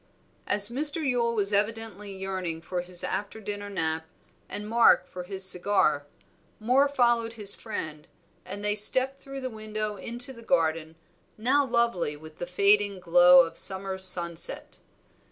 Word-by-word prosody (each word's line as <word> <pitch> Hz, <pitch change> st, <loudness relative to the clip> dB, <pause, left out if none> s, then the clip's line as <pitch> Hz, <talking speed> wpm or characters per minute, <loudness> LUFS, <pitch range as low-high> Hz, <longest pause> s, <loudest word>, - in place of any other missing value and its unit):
As 205 Hz, +1 st, +4 dB
Mr. 290 Hz, +4 st, 0 dB
Yule 235 Hz, -2 st, 0 dB
was 205 Hz, -1 st, +1 dB
evidently 210 Hz, -1 st, -3 dB
yearning 190 Hz, -4 st, -5 dB
for 175 Hz, +2 st, -5 dB
his 180 Hz, 0 st, -4 dB
after 205 Hz, +3 st, -4 dB
dinner 205 Hz, -1 st, -7 dB
nap, 160 Hz, -4 st, -3 dB, 0.4 s
and 210 Hz, 0 st, -7 dB
Mark 230 Hz, +1 st, +4 dB
for 180 Hz, -, -9 dB
his 190 Hz, 0 st, +4 dB
cigar, 180 Hz, -6 st, +2 dB, 0.5 s
Moor 255 Hz, +6 st, +2 dB
followed 235 Hz, -4 st, 0 dB
his 210 Hz, -3 st, +5 dB
friend, 155 Hz, -9 st, -7 dB, 0.4 s
and 205 Hz, +1 st, -7 dB
they 210 Hz, -, +1 dB
stepped 260 Hz, +6 st, +3 dB
through 275 Hz, 0 st, -9 dB
the 260 Hz, -, -4 dB
window 215 Hz, -1 st, -6 dB
into 245 Hz, +6 st, -3 dB
the 230 Hz, -, -14 dB
garden, 165 Hz, -5 st, -1 dB, 0.4 s
now 260 Hz, +6 st, +1 dB
lovely 235 Hz, -, -1 dB
with 155 Hz, +1 st, -15 dB
the 175 Hz, -, -5 dB
fading 200 Hz, +2 st, +2 dB
glow 180 Hz, 0 st, +6 dB
of 165 Hz, -, -5 dB
summer 190 Hz, 0 st, +1 dB
sunset. 175 Hz, -3 st, -1 dB
205 Hz, 150 wpm, -26 LUFS, 180-230 Hz, 0.5 s, glow